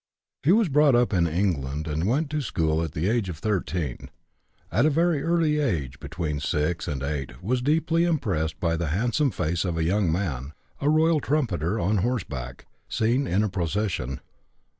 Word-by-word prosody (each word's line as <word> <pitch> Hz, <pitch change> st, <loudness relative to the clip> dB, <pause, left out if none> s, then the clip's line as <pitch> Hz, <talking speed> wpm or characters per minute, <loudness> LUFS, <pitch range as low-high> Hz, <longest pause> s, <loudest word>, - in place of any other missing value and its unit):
He 155 Hz, -, +3 dB
was 215 Hz, +1 st, +4 dB
brought 150 Hz, -2 st, +4 dB
up 120 Hz, -2 st, +2 dB
in 85 Hz, -3 st, +3 dB
England, 80 Hz, -4 st, -1 dB
and 80 Hz, +4 st, -1 dB
went 145 Hz, +6 st, 0 dB
to 150 Hz, 0 st, 0 dB
school 80 Hz, -, 0 dB
at 80 Hz, -3 st, -4 dB
the 80 Hz, +5 st, -1 dB
age 110 Hz, -3 st, +1 dB
of 85 Hz, -, -5 dB
13. 85 Hz, -, -2 dB, 0.6 s
At -, -, +3 dB
a -, -, +4 dB
very 165 Hz, 0 st, +2 dB
early 165 Hz, -2 st, +2 dB
age, 75 Hz, -, -1 dB
between 75 Hz, 0 st, -3 dB
6 75 Hz, +4 st, -1 dB
and 70 Hz, -2 st, -3 dB
8, 70 Hz, +3 st, -4 dB
was 125 Hz, +5 st, 0 dB
deeply 160 Hz, +4 st, +2 dB
impressed 95 Hz, -, -1 dB
by 85 Hz, -1 st, +1 dB
the 85 Hz, 0 st, -2 dB
handsome 120 Hz, -, +1 dB
face 85 Hz, -6 st, -1 dB
of 85 Hz, -3 st, -2 dB
a 80 Hz, -, +1 dB
young 90 Hz, +1 st, +2 dB
man, 75 Hz, -6 st, -2 dB, 0.3 s
a 145 Hz, -, +1 dB
royal 160 Hz, +1 st, +4 dB
trumpeter 115 Hz, -, 0 dB
on 105 Hz, +4 st, +1 dB
horseback, 90 Hz, -, -3 dB, 0.2 s
seen 120 Hz, +5 st, +1 dB
in 95 Hz, +5 st, +2 dB
a 105 Hz, -, 0 dB
procession. 85 Hz, -, -2 dB
95 Hz, 180 wpm, -25 LUFS, -, 0.6 s, was